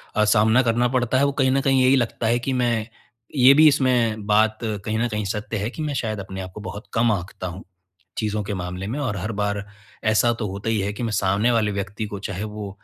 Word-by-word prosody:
अ, 105 - +3
सामना 110 +3 +4
करना 120 +1 +2
पड़ता 125 0 +1
है 140 - +4
वो 140 - +1
कहीं 130 -1 +3
न 135 +1 +2
कहीं 135 -1 +3
यही 130 +1 +5
लगता 120 -2 -1
है 120 +2 +2
कि 130 +3 -3
मैं, 120 -3 0 0.5
ये 130 0 +7
भी 155 +2 +7
इसमें 120 -7 +2
बात 110 +1 +3
कहीं 110 0 -2
न 120 - +1
कहीं 105 -2 -3
सत्य 105 +3 -3
है 105 +2 -2
कि 155 - -8
मैं 150 -1 -2
शायद 110 -5 -2
अपने 95 0 -6
आप 95 0 -7
को 105 - -7
बहुत 105 0 -7
कम 115 0 +3
आँकता 95 -1 -4
हूँ, 90 +2 -8 0.5
चीज़ों 105 -1 -1
के 105 +1 -4
मामले 90 +1 -5
में 120 +8 -3
और 125 -8 -2
हर 100 +4 -3
बार 100 0 -2 0.4
ऐसा 110 +2 +3
तो 115 -2 -4
होता 100 +3 -4
ही 110 -2 +1
है 100 +1 -2
कि 105 - -6
मैं 115 -2 -2
सामने 100 +3 +2
वाले 110 -3 +1
व्यक्ति 100 +2 -4
को 100 -1 -6
चाहे 95 +3 -4
वो 105 -1 -6
110 Hz, 250 wpm, -23 LUFS, 105-120 Hz, 0.5 s, ये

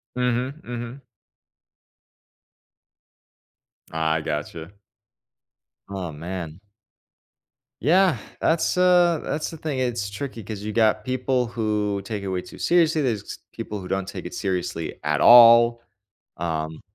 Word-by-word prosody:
Mhm, 125 +4 -1
mhm. 120 +2 -7 2.9
I 80 0 0
gotcha. 80 +2 -5 1.2
Oh 95 -4 -5
man. 85 +2 -7 1.2
Yeah, 180 +4 +4 0.2
that's 165 +2 +1
uh, 180 -3 +4
that's 150 - -3
the 165 - -9
thing, 150 -4 -4
it's 120 -5 -1
tricky 115 +2 -6
'cause 105 0 -7
you 105 +1 -4
got 110 -1 +2
people 130 0 -1
who 105 -3 -2
take 105 -1 -4
it 100 - -6
way 95 -1 -2
too - - -13
seriously, 165 -3 +3
there's 115 -7 -3
people 105 -2 -6
who 90 - -8
don't 95 0 -2
take - - -6
it - - -9
seriously 90 -3 -3
at 75 -1 0
all, 115 0 +8 0.6
um, 80 -1 -3
110 Hz, 120 wpm, -23 LUFS, 95-130 Hz, 2.9 s, all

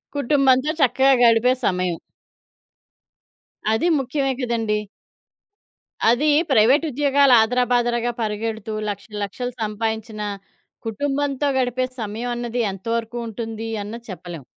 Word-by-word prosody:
కుటుంబంతో 275 0 +3
చక్కగా 270 +1 +4
గడిపే 235 +2 +5
సమయం. 180 -2 0 1.7
అది 220 +11 +1
ముఖ్యమే 270 +1 -1
కదండీ! 225 -3 0 1.3
అది 245 +7 +3 0.2
ప్రైవేట్ 260 +6 +5
ఉద్యోగాలాదరాబాదరాగా 245 -3 +3
పరిగెడుతూ, 220 0 -3 0.2
లక్షలు, 205 +1 -6
లక్షలు 245 +5 -4
సంపాదించిన 220 0 -3 0.7
కుటుంబంతో 285 +4 -1
గడిపే 255 0 0 0.2
సమయం 220 +3 -4
అన్నది 240 0 -2
ఎంతవరకు 230 +4 -3
ఉంటుంది 225 0 -5 0.2
అన్నది 230 +3 -8
చెప్పలేం. 175 -4 -8
235 Hz, 90 wpm, -22 LUFS, 220-255 Hz, 1.7 s, గడిపే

